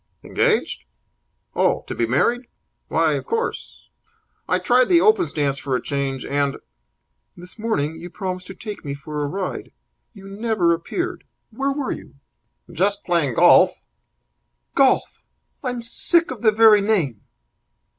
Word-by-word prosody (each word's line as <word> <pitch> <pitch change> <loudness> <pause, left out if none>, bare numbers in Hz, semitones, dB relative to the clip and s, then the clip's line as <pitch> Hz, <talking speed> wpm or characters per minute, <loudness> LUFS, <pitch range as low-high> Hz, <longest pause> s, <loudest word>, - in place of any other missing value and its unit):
"Engaged? - - 0 0.7
Oh, - - +1
to - - -5
be 115 - -1
married? 240 - +1 0.4
Why, - - +2
of - - -4
course. 460 +1 -4 0.6
I - - +3
tried 250 +1 +3
the 350 -2 +6
open 430 -2 +4
stance 140 -2 -1
for 135 -2 -2
a - - 0
change, 140 -2 -3
and 140 -1 0 0.4
" - - -48
"This 180 +5 -12
morning 160 -9 -1
you 175 - -8
promised 185 0 -5
to 190 - -9
take 210 +1 -8
me 140 -2 -4
for 150 +1 -6
a - - -1
ride. 185 +5 -5 0.4
You 195 -1 -12
never 200 -4 +1
appeared. 350 - -4 0.3
Where 275 +5 -1
were 275 -1 -3
you?" - - -8 0.6
"Just 200 +3 0
playing 165 -9 0
golf." - - +6 1.0
"Golf! 270 -1 +2 0.4
I'm 245 -2 -3
sick 330 +8 +2
of 245 -5 -7
the 220 - +5
very 215 -1 +6
name!" 175 - 0
195 Hz, 145 wpm, -22 LUFS, 145-240 Hz, 1.0 s, the